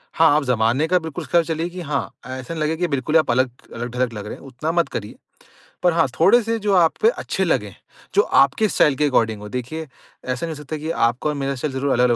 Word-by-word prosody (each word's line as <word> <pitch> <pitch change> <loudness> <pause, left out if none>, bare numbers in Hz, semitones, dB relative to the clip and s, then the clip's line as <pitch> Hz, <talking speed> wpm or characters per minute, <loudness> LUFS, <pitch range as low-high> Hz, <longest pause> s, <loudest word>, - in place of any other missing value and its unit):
हाँ, 165 0 +5
आप 150 - +2
ज़माने 125 +3 +1
का 180 +2 +3
बिल्कुल 160 -3 -6
उसके - - +1
साथ 170 - +5
चलिए 165 +2 -2
कि 180 +1 -7
हाँ, 150 -4 -2 0.2
ऐसा 130 +3 -6
ना 165 - -5
लगे 155 +1 0
कि 175 +1 0
बिल्कुल 140 0 -1
ही - - +8
आप 155 - +1
अलग 130 +1 +2 0.2
अ, 120 - -4
ढलग 125 0 -2
लग 105 -2 -6
रहे - - -6
हैं, - - -16
उतना 140 +5 -3
मत 170 0 +1
करिए। 105 -2 -6 0.7
पर 175 -1 +4
हाँ, 165 -3 +3
थोड़े 200 +9 +6
से 225 +1 -1
जो 205 -1 0
आप 170 -3 +4
पे 445 - +6
अच्छे - - -2
लगें, - - 0 0.4
जो 410 - +7 0.2
आपके 220 - +1
स्टाइल 150 -5 +3
के 150 +2 +2
अकॉर्डिंग 110 -6 +1
हो। 105 - -8
देखिए, 130 +7 -5 0.4
ऐसा 130 +5 -2
नहीं 165 -1 -5
हो 150 - -10
सकता 155 +2 -5
कि 155 +2 -5 0.2
आपका 120 +6 -2
और 150 - -2
मेरा 140 0 -2
स्टाइल 135 +2 -3
ज़रूर 135 +1 -1
अलग-अलग 125 0 +3
150 Hz, 260 wpm, -21 LUFS, 125-165 Hz, 0.7 s, ही